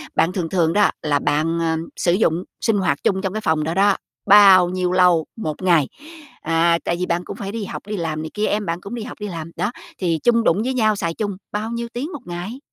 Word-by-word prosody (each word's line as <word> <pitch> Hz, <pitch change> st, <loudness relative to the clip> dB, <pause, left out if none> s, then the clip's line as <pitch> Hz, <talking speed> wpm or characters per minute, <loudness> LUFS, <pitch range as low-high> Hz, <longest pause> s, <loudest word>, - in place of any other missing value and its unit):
bạn 170 Hz, -, +3 dB
thường 170 Hz, -4 st, -2 dB
thường 170 Hz, -3 st, +1 dB
đó 205 Hz, -, +4 dB
là 145 Hz, -2 st, +1 dB
bạn, 160 Hz, +3 st, 0 dB
ờ, 160 Hz, -1 st, 0 dB, 0.2 s
sử 175 Hz, -, +2 dB
dụng 180 Hz, -3 st, +1 dB, 0.2 s
sinh 225 Hz, -3 st, +2 dB
hoạt 175 Hz, -7 st, 0 dB
chung 190 Hz, -1 st, +1 dB
trong 190 Hz, 0 st, -3 dB
cái 215 Hz, -, -3 dB
phòng 155 Hz, -7 st, +1 dB
đó 165 Hz, +2 st, -2 dB
đó, 200 Hz, +1 st, +3 dB, 0.3 s
bao 195 Hz, -3 st, +8 dB
nhiêu 180 Hz, -1 st, -1 dB
lâu 180 Hz, -3 st, +4 dB
1 160 Hz, -7 st, -5 dB
ngày? 170 Hz, -7 st, +3 dB, 0.5 s
À, 165 Hz, +1 st, +2 dB
tại 170 Hz, -, 0 dB
vì 180 Hz, -, 0 dB
bạn 170 Hz, 0 st, -1 dB
cũng -, -, -7 dB
phải 195 Hz, 0 st, -5 dB
đi 220 Hz, -2 st, -4 dB
học, -, -, -6 dB
đi 210 Hz, -, -3 dB
làm 160 Hz, -3 st, -3 dB
này 160 Hz, -, -5 dB
kia, 210 Hz, 0 st, -1 dB
em 210 Hz, 0 st, -1 dB
bạn 170 Hz, +1 st, -3 dB
cũng 200 Hz, +5 st, -7 dB
đi 225 Hz, -, -5 dB
học 240 Hz, -, -9 dB
đi 210 Hz, -, -4 dB
làm, 165 Hz, -2 st, -6 dB
đó, 220 Hz, -, -1 dB, 0.3 s
thì 170 Hz, -4 st, 0 dB
chung 235 Hz, -1 st, +3 dB
đụng 200 Hz, +4 st, +2 dB
với 260 Hz, +1 st, -1 dB
nhau 215 Hz, -4 st, +2 dB
xài 170 Hz, -4 st, -2 dB
chung 205 Hz, +1 st, -3 dB, 0.2 s
bao 210 Hz, +2 st, -3 dB
nhiêu 235 Hz, 0 st, -3 dB
tiếng 280 Hz, +9 st, -4 dB
1 285 Hz, -, -7 dB
ngày? 180 Hz, +9 st, -6 dB
185 Hz, 255 wpm, -21 LUFS, 165-210 Hz, 0.5 s, bao